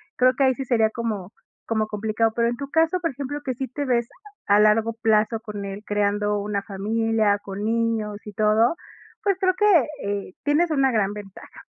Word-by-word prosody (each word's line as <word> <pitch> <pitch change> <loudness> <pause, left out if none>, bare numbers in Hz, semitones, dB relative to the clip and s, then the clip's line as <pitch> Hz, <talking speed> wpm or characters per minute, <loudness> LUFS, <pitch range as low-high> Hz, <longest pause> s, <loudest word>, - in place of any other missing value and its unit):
creo 255 0 +4
que 275 - +3
ahí 260 -1 +3
sí 270 - -4
sería 230 -4 +2
como 215 -4 -4 0.3
como 220 -1 0
complicado. 215 +1 0
Pero 235 0 +2
en 240 0 -2
tu 280 +1 -6
caso, 325 +3 +2
por 330 -2 0
ejemplo, 280 +2 -5
que 260 - -1
sí 265 +2 -4
te 285 +4 -4
ves 240 -3 +1 0.4
a 205 +1 +5
largo 215 +2 +3
plazo 220 0 +2
con 210 -3 -6
él, 200 +1 -7
creando 205 0 0
una 200 -1 -2
familia, 215 +1 0
con 200 +1 -6
niños 225 -2 -1
y 210 - -8
todo, 215 +6 +3 0.5
pues, 400 -3 +1
creo 375 -2 +3
que, 415 - +1 0.4
eh, 200 -2 -4
tienes 310 +4 +2
una 270 -3 +3
gran 205 -3 +1
ventaja. 205 -2 -11
225 Hz, 195 wpm, -23 LUFS, 210-255 Hz, 0.5 s, a